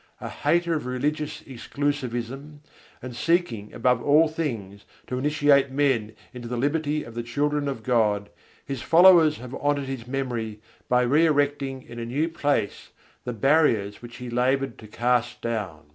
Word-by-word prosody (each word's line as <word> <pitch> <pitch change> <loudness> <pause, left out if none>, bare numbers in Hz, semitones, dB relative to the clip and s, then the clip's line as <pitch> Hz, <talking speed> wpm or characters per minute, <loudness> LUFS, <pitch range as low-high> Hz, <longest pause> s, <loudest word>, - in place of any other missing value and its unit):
A - - -6
hater 170 +3 +1
of 150 -5 -3
religious 150 +4 -2
exclusivism, 135 +1 -4 0.4
and 125 -2 -7
seeking 125 - 0
above 125 0 +1
all 150 +4 +5
things 115 -11 -5 0.2
to 125 - -3
initiate 145 -1 +3
men 130 -6 0 0.2
into 120 -1 -8
the 120 +1 -3
liberty 150 +3 0
of 115 - -11
the 120 - -3
children 145 +5 -1
of 135 -5 -4
God, 105 -4 +1 0.3
his 135 -3 -5
followers 170 -3 +6
have 125 +1 -9
honoured 145 0 0
his 130 -3 -6
memory 120 -5 -3 0.3
by 125 0 +4
re 150 +7 +4
erecting 145 -3 0
in 120 0 -9
a 115 - -4
new 145 +7 0
place 145 -9 -1 0.4
the 125 - -3
barriers 115 -5 +2
which 120 0 -10
he 125 - -8
laboured 130 +1 0
to 110 - -12
cast 120 +2 0
down. 105 -9 -4
130 Hz, 160 wpm, -25 LUFS, 120-145 Hz, 0.4 s, followers